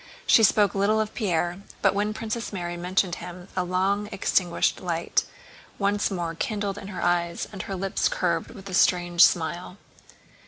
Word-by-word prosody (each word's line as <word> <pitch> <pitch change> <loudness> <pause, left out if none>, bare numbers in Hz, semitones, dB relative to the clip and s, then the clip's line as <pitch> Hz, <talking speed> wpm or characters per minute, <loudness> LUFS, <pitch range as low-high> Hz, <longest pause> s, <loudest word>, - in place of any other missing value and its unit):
She 230 - +6
spoke 205 -2 +4
little 205 +2 +2
of 215 -1 -2
Pierre, 175 -4 -1 0.2
but 195 - +4
when 205 +1 0
Princess 225 +1 -4
Mary 175 -3 -4
mentioned 180 +1 0
him 180 +1 -9
a 185 - +1
long 190 +3 0
extinguished 180 -3 +1
light 170 -2 0 0.5
once 205 0 +1
more 175 -4 -3
kindled 205 0 -3
in 195 - -9
her 195 -3 -5
eyes 170 -1 0
and 195 -3 -6
her 195 - -5
lips 190 +1 0
curved 170 -3 -1
with 195 -1 -11
a 190 - -7
strange 175 -1 +4
smile. 175 +2 +1
185 Hz, 165 wpm, -25 LUFS, 175-205 Hz, 0.5 s, She